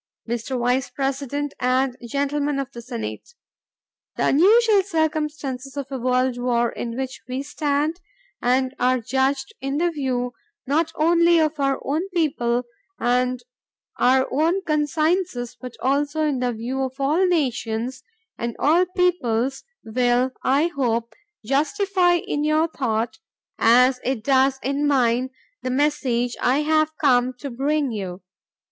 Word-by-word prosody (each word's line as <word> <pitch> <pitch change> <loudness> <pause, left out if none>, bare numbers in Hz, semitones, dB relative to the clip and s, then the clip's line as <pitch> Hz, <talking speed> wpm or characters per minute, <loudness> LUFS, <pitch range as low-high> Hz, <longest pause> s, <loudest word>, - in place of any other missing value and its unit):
Mr. 240 +3 -3
Vice 250 +2 +1
President 280 +1 -2
and 255 0 +1
Gentlemen 285 +3 -1
of 275 -2 -3
the 235 - -9
Senate: 240 - -6 0.8
The - - +1
unusual 420 - +5
circumstances 300 -6 -2
of 275 -1 -5
a 265 - -3
world 255 0 +1
war 240 -1 +1
in 235 0 -5
which 265 0 -4
we 255 +2 -3
stand 295 +2 -1 0.4
and 255 +1 +1
are 255 0 +3
judged 270 +3 -1
in 275 +1 -2
the 345 +2 +1
view 255 -5 -2 0.3
not 310 +4 +1
only 340 +2 +4
of 310 -1 +1
our 275 -1 +1
own 320 +8 -1
people 250 -7 +1 0.4
and 250 +1 +1 0.5
our 260 +1 +3
own 330 +8 +1
consciences 305 -3 0
but 250 -2 -8
also 290 +4 +1
in 290 -4 0 0.2
view 250 +4 -3
of 260 0 -4
all 300 +7 +2
nations 255 -6 -1 0.4
and 235 0 -3
all 340 +5 +3
peoples 270 -8 +1 0.2
will, 245 +2 +1
I 290 +6 +2
hope, 235 -4 -1 0.3
justify 355 - +2
in 295 -3 -2
your 310 +2 +2
thought, 235 -3 -2 0.4
as 250 +3 +5
it 250 -3 -2
does 265 +1 +3
in 280 +2 0
mine, 255 -2 +2 0.3
the 255 - -3
message 255 -3 0
I 265 +4 +3
have 310 0 +1
come 255 -3 +3
to 265 +2 -7
bring 280 +2 0
you. 190 -4 -5
270 Hz, 135 wpm, -23 LUFS, 250-305 Hz, 0.8 s, unusual